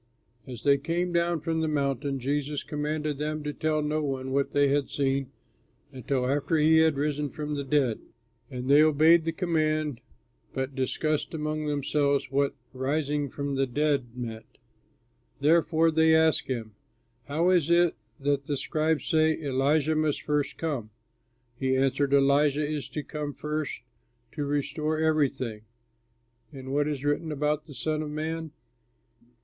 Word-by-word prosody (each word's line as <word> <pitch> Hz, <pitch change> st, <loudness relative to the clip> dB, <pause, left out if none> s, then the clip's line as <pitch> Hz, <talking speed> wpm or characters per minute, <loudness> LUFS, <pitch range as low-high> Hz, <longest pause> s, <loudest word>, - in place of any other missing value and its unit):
As 120 Hz, -3 st, -8 dB
they 140 Hz, -1 st, +4 dB
came 175 Hz, +4 st, -1 dB
down 170 Hz, -1 st, +1 dB
from 160 Hz, 0 st, -1 dB
the 160 Hz, -, 0 dB
mountain, 140 Hz, -2 st, -1 dB
he 145 Hz, +3 st, -2 dB
commanded 150 Hz, -1 st, -2 dB
them 155 Hz, 0 st, -2 dB
to 150 Hz, 0 st, -3 dB
tell 155 Hz, 0 st, 0 dB
no 150 Hz, +1 st, 0 dB
one 130 Hz, -2 st, -3 dB
what 140 Hz, +1 st, 0 dB
they 145 Hz, 0 st, +3 dB
had 140 Hz, 0 st, +1 dB
seen 135 Hz, -1 st, 0 dB, 0.6 s
until 130 Hz, 0 st, -2 dB
after 145 Hz, +4 st, +1 dB
he 155 Hz, +1 st, +5 dB
had 160 Hz, -1 st, +4 dB
risen 145 Hz, 0 st, -1 dB
from 150 Hz, 0 st, -5 dB
the 140 Hz, -1 st, -2 dB
dead. 135 Hz, -5 st, +1 dB, 0.5 s
And 125 Hz, -2 st, -5 dB
they 145 Hz, +2 st, +7 dB
obeyed 155 Hz, +2 st, +5 dB
the 165 Hz, -, 0 dB
command 155 Hz, -6 st, 0 dB, 0.5 s
but 130 Hz, +1 st, -2 dB
discussed 150 Hz, +4 st, -1 dB
among 155 Hz, 0 st, -2 dB
themselves 145 Hz, -1 st, 0 dB
what 140 Hz, 0 st, +1 dB, 0.2 s
"rising 145 Hz, +2 st, -1 dB
from 140 Hz, +1 st, -4 dB
the 135 Hz, 0 st, +1 dB
dead" 135 Hz, -2 st, -1 dB
meant. 115 Hz, -2 st, -7 dB, 0.8 s
Therefore 165 Hz, +2 st, +3 dB
they 160 Hz, 0 st, +4 dB
asked 160 Hz, 0 st, +3 dB
him, 115 Hz, -5 st, -4 dB, 0.5 s
"How 165 Hz, +5 st, +1 dB
is 170 Hz, -4 st, +3 dB
it 170 Hz, 0 st, +4 dB, 0.3 s
that 140 Hz, 0 st, 0 dB
the 145 Hz, -, -1 dB
scribes 155 Hz, +2 st, 0 dB
say, 160 Hz, 0 st, +2 dB
'Elijah 145 Hz, +2 st, +1 dB
must 155 Hz, -1 st, 0 dB
first 150 Hz, -2 st, -1 dB
come'?" 140 Hz, -10 st, -3 dB, 0.7 s
He 130 Hz, -1 st, +1 dB
answered, 135 Hz, +1 st, +1 dB
"Elijah 140 Hz, +1 st, +3 dB
is 150 Hz, -2 st, -4 dB
to 150 Hz, -, -4 dB
come 150 Hz, -2 st, -5 dB
first 150 Hz, -4 st, -4 dB, 0.5 s
to 145 Hz, -2 st, -3 dB
restore 150 Hz, +2 st, -1 dB
everything. 140 Hz, -8 st, 0 dB, 0.9 s
And 135 Hz, -2 st, -7 dB
what 145 Hz, +1 st, +2 dB
is 145 Hz, -2 st, -3 dB
written 150 Hz, +2 st, 0 dB
about 150 Hz, +1 st, -1 dB
the 145 Hz, -, -11 dB
Son 155 Hz, +2 st, -1 dB
of 155 Hz, -, -4 dB
Man? 160 Hz, +2 st, -3 dB
150 Hz, 155 wpm, -27 LUFS, 140-155 Hz, 0.9 s, they